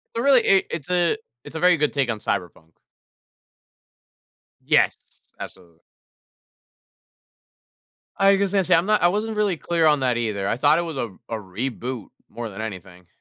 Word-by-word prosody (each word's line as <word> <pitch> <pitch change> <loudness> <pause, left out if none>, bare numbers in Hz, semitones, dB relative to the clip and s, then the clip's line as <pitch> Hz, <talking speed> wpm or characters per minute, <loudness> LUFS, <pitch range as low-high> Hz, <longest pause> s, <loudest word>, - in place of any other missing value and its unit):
So, 230 - -1
really, 270 -2 +5
i 195 -1 +5
it's 160 -2 -6
a 180 +2 +1 0.3
it's - - -12
a 160 - -3
very 180 0 +4
good 150 -1 +1
take 140 -4 0
on 110 - -5
cyberpunk. 80 -4 -4 1.9
Yes, - - +2 0.4
absolutely. 85 -3 -11 2.4
Like 195 0 +4
I 200 - +2
said, 195 -1 0
see - - +3
I'm 165 +2 +2
not 215 0 +2
I 175 - +5
wasn't 210 +4 -2
really 205 -5 +1
clear 165 +1 0
on 150 -2 +3
that 125 -2 +1
either, 105 -4 -2
I - - 0
thought 145 +6 +3
it - - -1
was 165 -5 -6
a 120 - -2 0.2
a 115 - -3
reboot 115 +4 -5 0.2
more 120 -2 -6
than 100 +2 -8
anything. 95 -4 -9
145 Hz, 170 wpm, -23 LUFS, 110-180 Hz, 2.4 s, really